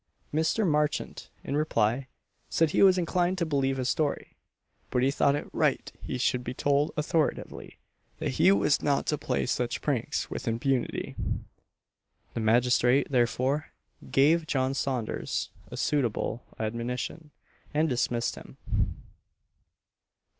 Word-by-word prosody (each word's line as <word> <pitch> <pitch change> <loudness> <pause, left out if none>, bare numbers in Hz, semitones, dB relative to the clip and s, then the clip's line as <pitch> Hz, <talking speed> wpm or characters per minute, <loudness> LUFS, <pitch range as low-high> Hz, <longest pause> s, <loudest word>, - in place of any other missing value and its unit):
Mr. 160 +7 +2
Marchant, 150 -1 -1
in 140 - -3
reply, 130 -4 +1 0.4
said 165 -2 +2
he - - +2
was 190 -1 +7
inclined 180 +1 +1
to 170 - 0
believe 135 -3 0
his 130 -1 -1
story, 145 +2 -1 0.5
but 125 - +1
he 135 - +3
thought 140 0 +3
it 145 - -4
right - - +1
he - - -4
should 125 0 +1
be 125 +1 -5
told 145 +2 +2
authoritatively 150 +1 -1 0.4
that - - -2
he 90 - +5
was 100 +8 +3
not 140 -2 +1
to 150 - +1
play 70 - -1
such - - -1
pranks - - -1
with - - -6
impunity. 120 +3 -1 1.2
The - - -3
magistrate, 125 +4 +3
therefore, 130 +4 +1 0.4
gave 155 +4 +4
John 130 -2 +1
Saunders 130 -5 -2 0.2
a - - -7
suitable 125 -4 -1
admonition, 120 +7 -3 0.4
and 155 +2 +2
dismissed 120 -3 0
him. - - -12
135 Hz, 130 wpm, -28 LUFS, 120-150 Hz, 1.2 s, was